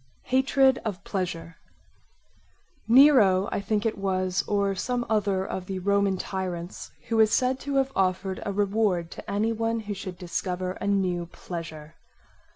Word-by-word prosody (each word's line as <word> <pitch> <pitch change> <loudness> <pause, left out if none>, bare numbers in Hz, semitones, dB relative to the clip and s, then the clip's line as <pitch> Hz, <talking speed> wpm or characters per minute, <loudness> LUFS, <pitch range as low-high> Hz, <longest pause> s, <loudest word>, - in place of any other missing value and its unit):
Hatred 265 0 +3
of 200 -3 -4
pleasure 170 -4 -4 1.3
Nero 225 -7 +6
I - - -1
think 210 +1 -1
it 220 -2 -1
was, 185 -2 0
or 200 -1 +1
some 245 +5 -2
other 200 -3 +1
of 185 -1 -5
the 190 - -3
Roman 200 0 +1
tyrants, 180 -2 -5 0.2
who 225 -1 +1
is 215 -1 +5
said 255 +1 +2
to 280 +1 -4
have 270 0 +2
offered 190 0 0
a 200 - -2
reward 200 -4 0
to - - -9
any 210 +3 +1
one 225 0 -1
who 210 -1 -5
should 185 -2 -7
discover 180 +1 -3
a 200 - -5
new 185 -4 0
pleasure. 160 -3 -8
195 Hz, 155 wpm, -26 LUFS, 185-220 Hz, 1.3 s, Nero